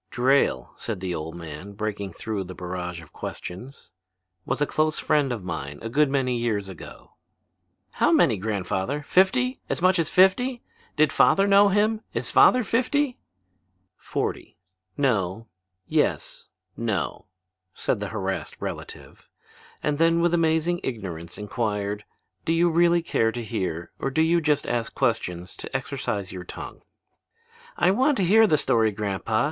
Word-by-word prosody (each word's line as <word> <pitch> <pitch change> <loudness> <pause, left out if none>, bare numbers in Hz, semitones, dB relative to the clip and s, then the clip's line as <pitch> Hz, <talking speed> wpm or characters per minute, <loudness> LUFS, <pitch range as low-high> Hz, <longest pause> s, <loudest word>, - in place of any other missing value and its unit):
"Drayle," 125 - +2
said 110 -5 -4
the 90 -1 -3
old 80 0 -5
man, 85 +4 -8
breaking 100 -2 -4
through 105 +1 -4
the 90 0 -9
barrage 90 -1 -5
of 80 - -18
questions, 125 +10 -8 0.6
"was - - -1
a 145 - +3
close 155 +1 +1
friend 145 -4 +1
of 115 -6 -4
mine 75 -5 -5
a 115 - -3
good 145 +4 +3
many 130 -3 0
years 105 -4 -1
ago." 95 - -11 0.8
"How - - +2
many, - - +4
grandfather? 100 +6 -2
Fifty? 250 - +2
As - - -1
much 185 0 +3
as 160 - +1
fifty? 240 +7 +3 0.3
Did 155 -1 +3
father 195 - +5
know 200 0 +6
him? 215 +2 +2
Is - - -1
father 250 0 +6
fifty?" 255 +4 0 0.8
"Forty; - - -4 0.4
no; 110 -6 0 0.4
yes; - - -1 0.3
no," 110 -4 -2 0.5
said - - -1
the 105 - -3
harassed 95 -3 -3
relative; - - -8 0.5
and 150 -1 0
then 165 0 +4
with 170 0 +2
amazing 165 +1 +2
ignorance 90 -8 -5
inquired: 105 -1 -3 0.4
"Do 165 - +1
you 170 +1 +3
really 170 +1 +3
care 115 -8 +1
to 120 - -4
hear 95 -7 -3
or - - -1
do 160 +4 +2
you 170 +1 +3
just 150 -2 +1
ask 120 -1 -2
questions 95 -8 -1
to - - -8
exercise 100 -3 -4
your 90 -1 -7
tongue?" - - -9 1.0
"I - - +4
want 265 +7 +2
to 195 - +1
hear 220 +5 +6
the 155 - +3
story, 115 -6 +2
grandpa. 105 +1 -1
120 Hz, 150 wpm, -25 LUFS, -, 1.0 s, know